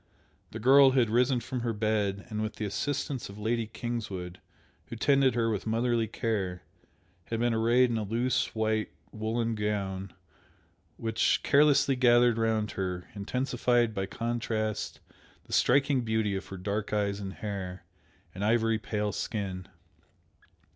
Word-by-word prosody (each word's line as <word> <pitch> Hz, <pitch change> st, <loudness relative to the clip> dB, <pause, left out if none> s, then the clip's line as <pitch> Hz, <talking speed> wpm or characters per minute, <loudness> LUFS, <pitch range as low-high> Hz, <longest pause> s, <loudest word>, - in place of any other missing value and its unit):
The -, -, -7 dB
girl 135 Hz, +3 st, +6 dB
had 120 Hz, -5 st, +3 dB
risen 125 Hz, +1 st, +3 dB
from 130 Hz, 0 st, -4 dB
her 115 Hz, -1 st, -1 dB
bed, 105 Hz, -2 st, -1 dB
and 105 Hz, -1 st, -3 dB
with 110 Hz, 0 st, -3 dB
the 110 Hz, -, -3 dB
assistance 135 Hz, +5 st, -3 dB
of 100 Hz, -, -10 dB
Lady 115 Hz, +1 st, -1 dB
Kingswood, 100 Hz, -7 st, -5 dB, 0.5 s
who -, -, -7 dB
tended 135 Hz, -2 st, +3 dB
her 115 Hz, -1 st, +1 dB
with 105 Hz, 0 st, -3 dB
motherly 115 Hz, 0 st, +1 dB
care, 100 Hz, -5 st, -2 dB, 0.6 s
had 115 Hz, -, -3 dB
been 120 Hz, 0 st, +2 dB
arrayed 120 Hz, +2 st, +3 dB
in 115 Hz, -, 0 dB
a -, -, -2 dB
loose 120 Hz, +5 st, 0 dB
white 110 Hz, 0 st, 0 dB, 0.2 s
woollen 115 Hz, +1 st, -1 dB
gown, 100 Hz, -3 st, -2 dB, 0.9 s
which, 110 Hz, -1 st, +1 dB
carelessly 140 Hz, -1 st, +4 dB
gathered 120 Hz, -2 st, +4 dB
round 110 Hz, -1 st, 0 dB
her, 90 Hz, -2 st, -4 dB
intensified 120 Hz, +2 st, 0 dB
by 95 Hz, -1 st, -2 dB
contrast 115 Hz, -2 st, -2 dB, 0.4 s
the -, -, -10 dB
striking 135 Hz, 0 st, +3 dB
beauty 110 Hz, -3 st, 0 dB
of 95 Hz, -, -5 dB
her 95 Hz, -, -7 dB
dark 100 Hz, +3 st, -3 dB
eyes 100 Hz, -1 st, 0 dB
and 95 Hz, -1 st, -5 dB
hair, 95 Hz, -4 st, -5 dB, 0.5 s
and 95 Hz, -, -5 dB
ivory 115 Hz, 0 st, +2 dB
pale 105 Hz, -2 st, -2 dB
skin. 95 Hz, -3 st, -4 dB
110 Hz, 145 wpm, -29 LUFS, 105-120 Hz, 0.9 s, girl